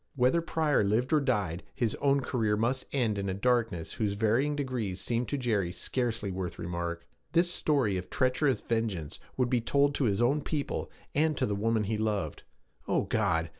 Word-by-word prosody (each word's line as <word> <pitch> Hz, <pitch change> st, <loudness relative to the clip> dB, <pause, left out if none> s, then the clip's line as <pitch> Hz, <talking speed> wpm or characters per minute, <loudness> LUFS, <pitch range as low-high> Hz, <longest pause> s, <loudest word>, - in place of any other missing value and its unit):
Whether 130 Hz, +6 st, +3 dB
Pryor 160 Hz, -6 st, +1 dB
lived 115 Hz, +8 st, +1 dB
or 155 Hz, -, +6 dB
died, 100 Hz, -, 0 dB
his 120 Hz, -5 st, 0 dB
own 140 Hz, 0 st, +3 dB
career 110 Hz, -5 st, 0 dB
must 120 Hz, +4 st, 0 dB
end 115 Hz, -7 st, +1 dB
in 100 Hz, 0 st, -2 dB
a 95 Hz, -, -1 dB
darkness 115 Hz, -6 st, 0 dB
whose 105 Hz, -3 st, -1 dB
varying 115 Hz, +8 st, +2 dB
degrees 125 Hz, -10 st, -2 dB
seemed 115 Hz, +5 st, -1 dB
to 145 Hz, -, -1 dB
Jerry 110 Hz, -9 st, 0 dB
scarcely 115 Hz, +1 st, -2 dB
worth 90 Hz, -2 st, -4 dB
remark. 85 Hz, 0 st, -4 dB, 0.3 s
This 175 Hz, +1 st, +4 dB
story 135 Hz, -, +1 dB
of 90 Hz, 0 st, -6 dB
treacherous 130 Hz, -1 st, +1 dB
vengeance 110 Hz, -10 st, -2 dB, 0.2 s
would 125 Hz, -2 st, +1 dB
be 125 Hz, -2 st, +3 dB
told 140 Hz, +4 st, +2 dB
to 140 Hz, -, 0 dB
his 100 Hz, -2 st, +1 dB
own 135 Hz, +5 st, +3 dB
people, 145 Hz, -1 st, -3 dB, 0.2 s
and 155 Hz, 0 st, +2 dB
to -, -, +2 dB
the 105 Hz, -, -1 dB
woman 110 Hz, +2 st, +1 dB
he 105 Hz, +1 st, -1 dB
loved. 105 Hz, -8 st, -1 dB, 0.5 s
Oh, -, -, +2 dB
God! 80 Hz, 0 st, +1 dB
115 Hz, 185 wpm, -30 LUFS, 100-135 Hz, 0.5 s, or